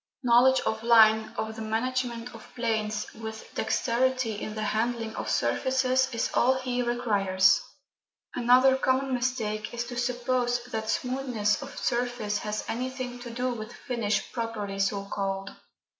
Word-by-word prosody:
Knowledge 250 +2 +5
of 220 0 -2
line, 220 -2 +5
of 220 0 -3
the 220 - -7
management 240 +2 -2
of - - -13
planes, 215 -3 -1
with 220 0 -8
dexterity 245 +1 0
in 215 - -5
the 215 - -3
handling 225 +1 -1
of - - -4
surfaces, 260 0 +1
is 230 - -1
all 255 +2 +4
he 250 -1 -2
requires. 205 -6 +3 0.7
Another 255 +2 +5
common 265 0 +1
mistake 235 -4 -2
is 235 - -1
to 240 0 -7
suppose 245 0 0
that 220 -1 -3
smoothness 250 -4 0
of 280 0 -9
surface 240 -4 -1
has 210 0 -3
anything 255 0 -4
to 245 0 -8
do 250 +2 -2
with 220 0 -7
finish 230 -6 -2
properly 215 -4 -4
so 195 0 0
called. 195 -1 -3
235 Hz, 145 wpm, -27 LUFS, 220-250 Hz, 0.7 s, Knowledge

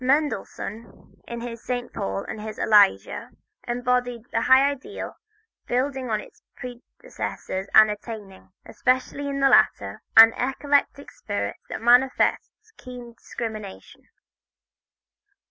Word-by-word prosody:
Mendelssohn, 250 -5 -3
in 235 0 -6
his 235 -1 -7
"St. 245 -1 -4
Paul" 95 0 -3
and 215 - -7
his 215 0 -7
"Elijah," 205 - +3 0.4
embodied 245 -1 -1
a 225 - +1
high 260 +3 +6
ideal, 290 +10 -7 0.5
building 260 0 -1
on 215 -1 0
his - - -14
predecessors 245 - -7
and 215 -1 +8
attaining, 210 -3 -9 0.2
especially 260 +3 -1
in 275 0 -3
the 275 - +5
latter, - - +3 0.2
an 225 0 +10
eclectic 280 +2 -1
spirit - - -4
that - - -6
manifests 260 - +2
keen 245 -2 -10
discrimination. 220 -4 -8
245 Hz, 110 wpm, -24 LUFS, 220-265 Hz, 0.5 s, an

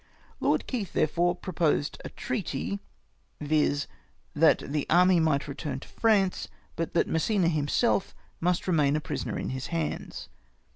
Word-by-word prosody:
Lord - - +1
Keith, 220 -8 -4
therefore, 175 +3 +2
proposed 165 -5 -1
a - - -6
treaty, 200 - -3 0.6
viz. 145 -1 +1 0.5
that 160 +2 +5
the 145 0 -2
army 180 +1 +5
might 155 -3 +1
return 140 -1 -4
to - - -12
France, 205 -5 +1 0.3
but 165 0 -3
that 170 - +3
Massena 170 +2 +1
himself 155 +7 +1 0.2
must 180 +2 0
remain 150 -5 +3
a - - +1
prisoner 150 -2 -4
in - - -3
his 130 0 -4
hands. 165 -2 -4
165 Hz, 140 wpm, -28 LUFS, 150-180 Hz, 0.6 s, that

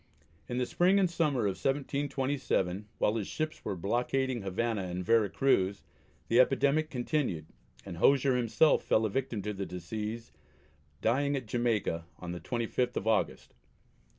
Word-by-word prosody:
In 120 - -2
the 125 - +1
spring 180 +8 +3
and 195 -2 +4
summer 155 -7 0
of 100 -3 -2
1727, 135 -8 -1
while 110 - +1
his 105 - -3
ships 155 0 -4
were 100 - -3
blockading 120 +6 -1
Havana 105 +3 -1
and 90 0 -4
Vera 110 0 +4
Cruz, 100 -7 +1 0.4
the 115 - +3
epidemic 140 +4 +3
continued, 125 - -1 0.4
and 90 -4 -7
Hosier 135 +6 +4
himself 125 +6 +3
fell 110 - +2
a 110 - -1
victim 120 -4 -2
to 105 +1 -3
the 100 -1 -4
disease, 105 +6 -5 0.7
dying 140 +5 +2
at 130 -3 -3
Jamaica 110 -8 -1
on 90 -1 -6
the 90 - -5
25th 120 +2 -2
of - - -2
August. 110 -1 0
120 Hz, 150 wpm, -30 LUFS, 100-135 Hz, 0.7 s, and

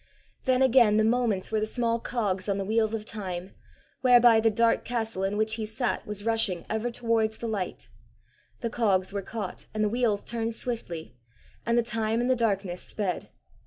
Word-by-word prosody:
Then 260 -1 +3
again 240 -5 +5
the 220 - +4
moments 225 -4 +1
were 220 - +1
the 215 - -1
small 235 0 0
cogs 205 -5 -2
on 200 - +1
the 195 - -2
wheels 220 +1 +1
of 215 -1 -5
time, 190 -4 -5 0.5
whereby 245 -2 +7
the 225 0 +4
dark 230 +2 +2
castle 225 -5 -2
in 195 +2 -1
which 215 0 +2
he - - -1
sat 240 +2 -2
was 210 0 -4
rushing 220 -6 0
ever 220 +2 -1
towards 230 -2 0
the 235 - -4
light: 200 -5 -4 0.7
the 230 - -1
cogs 195 -5 +1
were 200 - -2
caught 205 -1 -6
and 215 - +1
the 210 - +2
wheels 225 -3 0
turned 230 -1 -2
swiftly, 170 - -4 0.5
and 235 0 +3
the 240 - +4
time 225 -1 -1
and 245 +2 +1
the - - +4
darkness 195 -6 -1
sped. 195 -5 -3
220 Hz, 190 wpm, -27 LUFS, 205-235 Hz, 0.7 s, whereby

